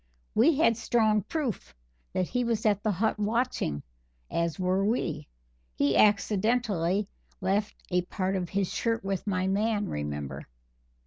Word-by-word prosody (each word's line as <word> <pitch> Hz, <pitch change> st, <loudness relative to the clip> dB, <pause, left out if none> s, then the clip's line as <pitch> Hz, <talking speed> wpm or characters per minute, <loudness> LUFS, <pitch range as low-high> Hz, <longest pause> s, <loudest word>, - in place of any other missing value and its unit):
We 285 Hz, +8 st, +5 dB
had 230 Hz, -8 st, +4 dB
strong 220 Hz, -2 st, +2 dB
proof 275 Hz, -, -4 dB, 0.4 s
that 185 Hz, -, 0 dB
he 245 Hz, 0 st, 0 dB
was 230 Hz, -2 st, -1 dB
at 205 Hz, -2 st, +3 dB
the 215 Hz, -, 0 dB
hut 215 Hz, +3 st, 0 dB
watching, 210 Hz, -, 0 dB, 0.5 s
as 170 Hz, -1 st, -1 dB
were 185 Hz, +1 st, +1 dB
we; 165 Hz, -9 st, -1 dB, 0.5 s
he 140 Hz, -1 st, +2 dB
accidentally 205 Hz, -2 st, +2 dB, 0.3 s
left 200 Hz, +2 st, 0 dB, 0.2 s
a 180 Hz, 0 st, +3 dB
part 185 Hz, +2 st, -2 dB
of 180 Hz, -2 st, -2 dB
his 195 Hz, -2 st, -1 dB
shirt 230 Hz, 0 st, 0 dB
with 195 Hz, +1 st, -3 dB
my 185 Hz, -2 st, 0 dB
man, 210 Hz, +1 st, +1 dB
remember. 75 Hz, -2 st, -4 dB
200 Hz, 140 wpm, -28 LUFS, 180-225 Hz, 0.5 s, We